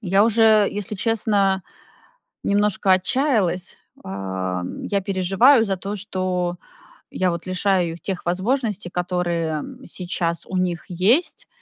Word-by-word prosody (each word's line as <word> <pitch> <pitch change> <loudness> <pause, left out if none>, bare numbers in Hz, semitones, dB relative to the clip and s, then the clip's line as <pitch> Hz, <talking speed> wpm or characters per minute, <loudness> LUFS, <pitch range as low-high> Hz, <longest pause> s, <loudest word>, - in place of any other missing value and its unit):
я 195 0 +3
уже, 220 -2 +5
если 205 +1 -4
честно, 200 -3 +1 0.8
немножко 200 -1 +2
отчаялась. 190 - +1 0.3
Ам, 95 -2 -4
я 200 -1 0
переживаю 195 +7 +4
за 195 -1 -1
то, 200 +3 -5
что 185 -2 -2 0.6
я 185 -1 0
вот 170 0 -5
лишаю 185 -2 +1
их 170 - -12
тех 190 -3 -4
возможностей, 210 +1 -1
которые 175 -3 -1 0.2
сейчас 175 -2 -3
у 185 - -3
них 175 -2 -1
есть, 235 - +1
185 Hz, 120 wpm, -22 LUFS, 175-210 Hz, 0.8 s, уже